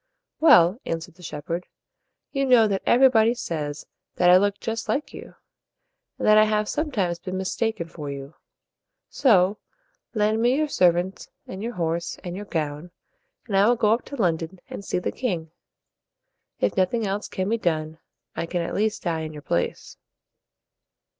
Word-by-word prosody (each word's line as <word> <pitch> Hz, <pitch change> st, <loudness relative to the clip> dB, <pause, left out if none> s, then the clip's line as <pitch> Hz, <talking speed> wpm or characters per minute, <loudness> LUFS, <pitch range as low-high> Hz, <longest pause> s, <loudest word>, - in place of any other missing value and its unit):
"Well," 215 Hz, -, +6 dB
answered 165 Hz, +1 st, -4 dB
the 180 Hz, -, -19 dB
shepherd, 165 Hz, +2 st, -5 dB, 0.6 s
"you 275 Hz, -1 st, 0 dB
know 250 Hz, -4 st, +5 dB
that 195 Hz, -2 st, -1 dB
everybody 240 Hz, -2 st, +5 dB
says 150 Hz, -8 st, -4 dB, 0.3 s
that 180 Hz, 0 st, +5 dB
I 180 Hz, -, +9 dB
look 205 Hz, +1 st, +1 dB
just 225 Hz, 0 st, -4 dB
like 295 Hz, -, -1 dB
you, -, -, -10 dB, 0.8 s
and -, -, -2 dB
that 215 Hz, 0 st, +7 dB
I 215 Hz, -, +6 dB
have 215 Hz, 0 st, 0 dB
some 305 Hz, +6 st, -1 dB
times 180 Hz, -9 st, -1 dB
been 185 Hz, -1 st, -5 dB
mis 190 Hz, 0 st, -3 dB
tak 225 Hz, -1 st, -1 dB
en 170 Hz, -, -4 dB
for 150 Hz, -3 st, -7 dB
you. 140 Hz, +1 st, -7 dB, 0.8 s
So, 205 Hz, -6 st, +3 dB, 0.6 s
lend 215 Hz, +1 st, +2 dB
me 245 Hz, +2 st, +3 dB
your 305 Hz, +1 st, +1 dB
servants 180 Hz, -3 st, +1 dB, 0.2 s
and 190 Hz, -, -8 dB
your 235 Hz, +2 st, -4 dB
horse 170 Hz, -2 st, -2 dB
and 175 Hz, -1 st, -5 dB
your 205 Hz, +2 st, -6 dB
gown, 155 Hz, -2 st, -3 dB, 0.6 s
and 210 Hz, -5 st, -3 dB
I 195 Hz, +2 st, +5 dB
will 240 Hz, -, +4 dB
go 215 Hz, -2 st, +3 dB
up 235 Hz, -, -1 dB
to 280 Hz, -, -8 dB
London 175 Hz, -, -1 dB
and -, -, -8 dB
see -, -, -2 dB
the 180 Hz, -, -2 dB
king. 170 Hz, -11 st, -3 dB, 1.1 s
If 105 Hz, -, 0 dB
nothing 195 Hz, +4 st, +1 dB
else 200 Hz, +1 st, -2 dB
can 190 Hz, 0 st, -3 dB
be 230 Hz, +2 st, 0 dB
done, 160 Hz, -3 st, -2 dB, 0.4 s
I 170 Hz, -, -3 dB
can 175 Hz, 0 st, -2 dB
at -, -, -4 dB
least 215 Hz, +1 st, -1 dB
die 165 Hz, -3 st, -1 dB
in 155 Hz, 0 st, -6 dB
your 150 Hz, -1 st, -10 dB
place." 85 Hz, -, -2 dB
190 Hz, 180 wpm, -24 LUFS, 165-220 Hz, 1.1 s, I